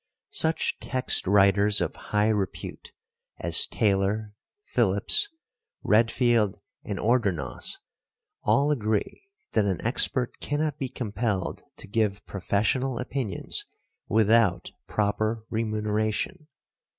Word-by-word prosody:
Such 160 Hz, 0 st, 0 dB
text 130 Hz, -7 st, 0 dB
writers 100 Hz, +1 st, +5 dB
of -, -, -2 dB
high 105 Hz, +1 st, 0 dB
repute 100 Hz, -4 st, -3 dB, 0.5 s
as -, -, +4 dB
Taylor, 105 Hz, +1 st, 0 dB, 0.3 s
Phillips, 415 Hz, 0 st, +2 dB, 0.5 s
Redfield 115 Hz, -1 st, +2 dB, 0.2 s
and -, -, -4 dB
Ordronaux, 110 Hz, -7 st, 0 dB, 0.6 s
all 145 Hz, +2 st, +2 dB
agree 110 Hz, -, -2 dB, 0.2 s
that 110 Hz, -, +2 dB
an 95 Hz, -3 st, -1 dB
expert 125 Hz, +1 st, +2 dB
cannot 150 Hz, 0 st, -2 dB
be 135 Hz, -, -3 dB
compelled 105 Hz, -5 st, -3 dB, 0.2 s
to -, -, -11 dB
give 100 Hz, -1 st, -1 dB
professional 110 Hz, +7 st, -1 dB
opinions 125 Hz, -6 st, -2 dB, 0.4 s
without 110 Hz, -4 st, +3 dB, 0.2 s
proper 110 Hz, +2 st, -1 dB
remuneration. 110 Hz, -, -2 dB
110 Hz, 95 wpm, -26 LUFS, 100-125 Hz, 0.6 s, writers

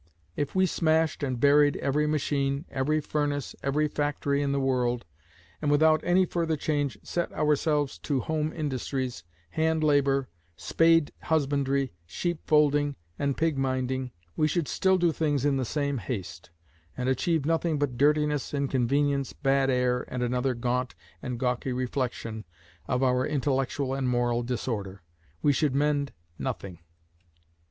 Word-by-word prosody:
If 145 Hz, +3 st, -3 dB
we 185 Hz, 0 st, +4 dB
smashed 160 Hz, -2 st, +1 dB
and 130 Hz, -4 st, -2 dB
buried 145 Hz, +2 st, +5 dB
every 150 Hz, +2 st, 0 dB
machine, 140 Hz, -1 st, 0 dB
every 145 Hz, +4 st, +1 dB
furnace, 145 Hz, -2 st, -2 dB
every 150 Hz, +2 st, +1 dB
factory 145 Hz, -1 st, -1 dB
in 140 Hz, -1 st, 0 dB
the 140 Hz, -, +1 dB
world, 125 Hz, -2 st, 0 dB, 0.6 s
and 150 Hz, -, 0 dB
without 155 Hz, +1 st, +4 dB
any 180 Hz, +1 st, +3 dB
further 165 Hz, -3 st, -1 dB
change 145 Hz, -2 st, -1 dB
set 175 Hz, -, -2 dB
ourselves 150 Hz, -1 st, +1 dB
to 140 Hz, -3 st, -1 dB
home 155 Hz, +1 st, -1 dB
industries, 130 Hz, -, -3 dB, 0.3 s
hand 160 Hz, 0 st, +1 dB
labour, 140 Hz, -3 st, +3 dB, 0.3 s
spade 165 Hz, -, +3 dB
husbandry, 140 Hz, -, 0 dB
sheep 175 Hz, -, -2 dB
folding 145 Hz, -1 st, +3 dB, 0.2 s
and 140 Hz, -1 st, 0 dB
pig 160 Hz, -3 st, +1 dB
minding, 130 Hz, -1 st, -1 dB, 0.3 s
we 155 Hz, -, +2 dB
should 160 Hz, -1 st, -1 dB
still 190 Hz, 0 st, +2 dB
do 175 Hz, -2 st, +3 dB
things 145 Hz, -4 st, 0 dB
in 140 Hz, -2 st, +2 dB
the 130 Hz, -, -1 dB
same 140 Hz, +1 st, -1 dB
haste, 90 Hz, -5 st, -6 dB, 0.5 s
and 125 Hz, 0 st, -2 dB
achieve 140 Hz, +4 st, +1 dB
nothing 165 Hz, 0 st, +1 dB
but 145 Hz, -3 st, -1 dB
dirtiness, 150 Hz, +1 st, +1 dB
inconvenience, 140 Hz, +1 st, +1 dB
bad 135 Hz, -1 st, +1 dB
air, 125 Hz, -1 st, +1 dB
and 125 Hz, -1 st, -3 dB
another 125 Hz, +1 st, 0 dB
gaunt 125 Hz, +1 st, -1 dB, 0.3 s
and 125 Hz, -3 st, -4 dB
gawky 125 Hz, 0 st, -1 dB
reflection 125 Hz, -3 st, -3 dB, 0.4 s
of 125 Hz, +1 st, 0 dB
our 125 Hz, -1 st, +3 dB
intellectual 135 Hz, -1 st, -1 dB
and 135 Hz, -2 st, -1 dB
moral 120 Hz, -1 st, +1 dB
disorder. 110 Hz, -6 st, -4 dB, 0.4 s
We 145 Hz, -, +4 dB
should 140 Hz, 0 st, +1 dB
mend 145 Hz, -1 st, +1 dB, 0.3 s
nothing. 90 Hz, -3 st, -4 dB
140 Hz, 145 wpm, -27 LUFS, 130-150 Hz, 0.6 s, buried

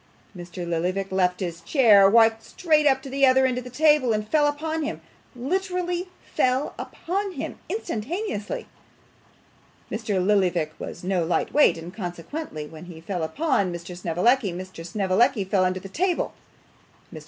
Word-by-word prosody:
Mr. 175 Hz, 0 st, -7 dB
Lillyvick 180 Hz, +4 st, -1 dB
left 180 Hz, -1 st, +1 dB
his 170 Hz, -2 st, -4 dB
chair, 210 Hz, -, +6 dB
walked 225 Hz, +1 st, +5 dB
straight 305 Hz, +4 st, +1 dB
up 265 Hz, -1 st, +3 dB
to 270 Hz, -, -7 dB
the 275 Hz, +1 st, -1 dB
other 265 Hz, 0 st, +6 dB
end 250 Hz, -1 st, 0 dB
of -, -, -8 dB
the 250 Hz, -, -9 dB
table, 295 Hz, -2 st, +3 dB
and 215 Hz, 0 st, -2 dB
fell 295 Hz, +3 st, +3 dB
upon 315 Hz, +2 st, -2 dB
him 295 Hz, -, -3 dB, 0.4 s
literally 360 Hz, +5 st, -2 dB, 0.3 s
fell 255 Hz, +3 st, +1 dB
upon 390 Hz, +3 st, -3 dB
him -, -, -6 dB
instantaneously. 330 Hz, -, -3 dB, 1.3 s
Mr. 215 Hz, -2 st, -2 dB
Lillyvick 180 Hz, -5 st, +2 dB
was 170 Hz, -, -7 dB
no 185 Hz, -2 st, 0 dB
light 165 Hz, +2 st, -1 dB
weight, 295 Hz, -, +5 dB
and 165 Hz, +2 st, -9 dB
consequently 175 Hz, -, -6 dB
when 160 Hz, +2 st, -11 dB
he 175 Hz, -2 st, -10 dB
fell 175 Hz, +2 st, -4 dB
upon 200 Hz, -, 0 dB
Mr. 175 Hz, +1 st, -7 dB
Snevellicci, 185 Hz, +6 st, +1 dB
Mr. 185 Hz, -1 st, -8 dB
Snevellicci 200 Hz, +6 st, +1 dB
fell 190 Hz, 0 st, +1 dB
under 185 Hz, 0 st, 0 dB
the 195 Hz, -, -9 dB
table. 350 Hz, -, -1 dB, 0.8 s
Mr. -, -, -7 dB
215 Hz, 155 wpm, -24 LUFS, 180-290 Hz, 1.3 s, chair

